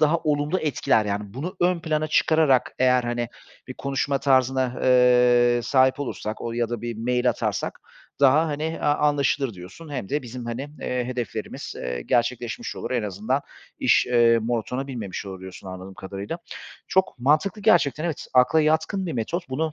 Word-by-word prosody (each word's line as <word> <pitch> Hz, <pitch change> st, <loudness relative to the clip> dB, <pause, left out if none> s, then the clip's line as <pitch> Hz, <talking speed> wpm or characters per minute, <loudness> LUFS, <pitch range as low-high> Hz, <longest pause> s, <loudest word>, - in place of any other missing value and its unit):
daha 155 Hz, +2 st, +4 dB
olumlu 150 Hz, +2 st, 0 dB
etkiler, 140 Hz, -6 st, +1 dB
yani, 100 Hz, 0 st, -4 dB
bunu 160 Hz, +8 st, -5 dB
ön 175 Hz, 0 st, +2 dB
plana 155 Hz, -1 st, -1 dB
çıkararak 155 Hz, -4 st, +3 dB
eğer, 125 Hz, -1 st, +4 dB
hani, 120 Hz, 0 st, -2 dB, 0.4 s
bir 130 Hz, -, -6 dB
konuşma 140 Hz, 0 st, -1 dB
tarzına, 130 Hz, -2 st, +2 dB
eee, 125 Hz, -1 st, +5 dB
sahip 130 Hz, +1 st, +3 dB
olursak 110 Hz, -5 st, -4 dB
o 115 Hz, -, -4 dB
ya 120 Hz, 0 st, -1 dB
da 120 Hz, -1 st, -4 dB
bir 120 Hz, -1 st, -4 dB
mail 125 Hz, +1 st, +1 dB
atarsak -, -, -3 dB, 0.4 s
daha, 145 Hz, +4 st, +5 dB
hani, 150 Hz, -1 st, -3 dB
eee, 160 Hz, +1 st, -3 dB
anlaşılır 145 Hz, -4 st, +1 dB
diyorsun. 95 Hz, -, -11 dB
Hem 125 Hz, -8 st, -4 dB
de 145 Hz, +1 st, -1 dB
bizim, 125 Hz, 0 st, -7 dB
hani, 125 Hz, +5 st, -5 dB
eee, 125 Hz, -1 st, -2 dB
hedeflerimiz, 120 Hz, -4 st, -5 dB
eee, 60 Hz, -1 st, -4 dB
gerçekleşmiş 120 Hz, -, -1 dB
olur, -, -, -5 dB
en 125 Hz, -3 st, 0 dB
azından 105 Hz, +7 st, -1 dB, 0.4 s
iş, -, -, +3 dB
eee, 120 Hz, -1 st, +4 dB
monotona 120 Hz, +3 st, -2 dB
binmemiş 110 Hz, -7 st, -5 dB
olur 95 Hz, -1 st, -7 dB
diyorsun, 95 Hz, +1 st, -10 dB
anladığım 95 Hz, +1 st, -8 dB
kadarıyla. 100 Hz, -, -6 dB, 0.5 s
Çok 190 Hz, -7 st, +1 dB
mantıklı 155 Hz, -, +1 dB
gerçekten, 165 Hz, -7 st, +3 dB
evet, 165 Hz, -4 st, -3 dB
akla 130 Hz, +5 st, +5 dB
yatkın 160 Hz, +5 st, +1 dB
bir 165 Hz, -, -3 dB
metot. 170 Hz, +10 st, -3 dB
Bunu 155 Hz, +4 st, -2 dB
130 Hz, 165 wpm, -24 LUFS, 120-150 Hz, 0.5 s, eee